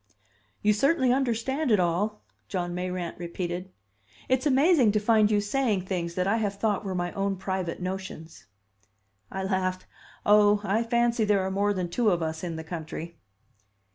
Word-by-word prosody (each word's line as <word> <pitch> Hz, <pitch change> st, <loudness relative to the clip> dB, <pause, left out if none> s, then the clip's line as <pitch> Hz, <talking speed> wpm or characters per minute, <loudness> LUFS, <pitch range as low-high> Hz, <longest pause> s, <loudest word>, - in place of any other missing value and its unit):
"You 210 Hz, 0 st, +4 dB
certainly 260 Hz, +2 st, +3 dB
understand 265 Hz, +3 st, 0 dB
it 210 Hz, -3 st, +4 dB
all," 185 Hz, +5 st, 0 dB, 0.2 s
John 175 Hz, -2 st, -3 dB
Mayrant 180 Hz, -1 st, -4 dB
repeated. 175 Hz, +1 st, -4 dB, 0.6 s
"It's 260 Hz, +3 st, +1 dB
amazing 275 Hz, -, +4 dB
to 210 Hz, -, +3 dB
find 215 Hz, 0 st, +4 dB
you 210 Hz, -1 st, +3 dB
saying 205 Hz, -2 st, 0 dB
things 170 Hz, -3 st, -3 dB
that 180 Hz, -, 0 dB
I 200 Hz, +4 st, +2 dB
have 205 Hz, -3 st, -1 dB
thought 210 Hz, 0 st, 0 dB
were 190 Hz, -2 st, -3 dB
my 175 Hz, 0 st, -2 dB
own 195 Hz, 0 st, -1 dB
private 190 Hz, -2 st, -3 dB
notions." 185 Hz, -3 st, -6 dB, 0.9 s
I 190 Hz, 0 st, -3 dB
laughed. 185 Hz, -1 st, -1 dB, 0.4 s
"Oh, 205 Hz, 0 st, +5 dB
I 210 Hz, +2 st, +1 dB
fancy 235 Hz, 0 st, +1 dB
there 205 Hz, -2 st, +2 dB
are 190 Hz, -, -2 dB
more 200 Hz, +2 st, +1 dB
than 185 Hz, -3 st, -2 dB
two 220 Hz, +6 st, +1 dB
of 175 Hz, -3 st, +1 dB
us 160 Hz, +1 st, -4 dB
in 170 Hz, -2 st, -3 dB
the 160 Hz, -, -5 dB
country." 165 Hz, 0 st, -7 dB
195 Hz, 170 wpm, -27 LUFS, 180-220 Hz, 0.9 s, Oh